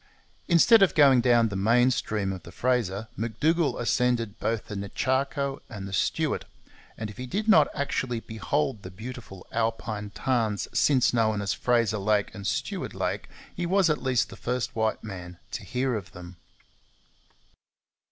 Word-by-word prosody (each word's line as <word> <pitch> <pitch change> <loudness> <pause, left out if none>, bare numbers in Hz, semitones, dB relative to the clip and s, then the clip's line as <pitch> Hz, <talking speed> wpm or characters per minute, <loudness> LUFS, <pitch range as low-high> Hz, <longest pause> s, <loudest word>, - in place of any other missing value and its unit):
Instead 200 +6 +6
of 195 - +4
going 135 -5 +6
down 120 -2 +4
the 100 - -5
main 120 +6 +4
stream 105 -5 -1
of 95 - -7
the - - -12
Fraser, 115 -5 -1
M'Dougall 140 - 0
ascended 120 -3 0
both 110 -3 -1
the 105 - -7
Nechaco 135 +7 -1
and 100 -4 -7
the 95 - -8
Stuart; - - 0 0.5
and 110 -1 -5
if - - -15
he 125 0 -6
did 205 - -2
not 155 -9 +6
actually 130 -4 -1
behold 110 +2 -2
the 90 - -8
beautiful 110 -1 -9
alpine 110 -2 -2
tarns 110 -3 -1
since 130 -5 +3
known 110 -3 +2
as 100 -1 -1
Fraser 115 -4 +1
Lake 105 0 +1
and 100 -2 -6
Stuart - - -3
Lake, - - -3 0.3
he 175 -1 -2
was 190 -2 +3
at 150 - -1
least 130 -2 +1
the - - -10
first 125 +1 -3
white 110 -1 0
man 90 -4 -8
to - - -5
hear 125 +6 -1
of 105 -2 -5
them. 90 -1 -11
115 Hz, 160 wpm, -27 LUFS, 105-130 Hz, 0.5 s, Instead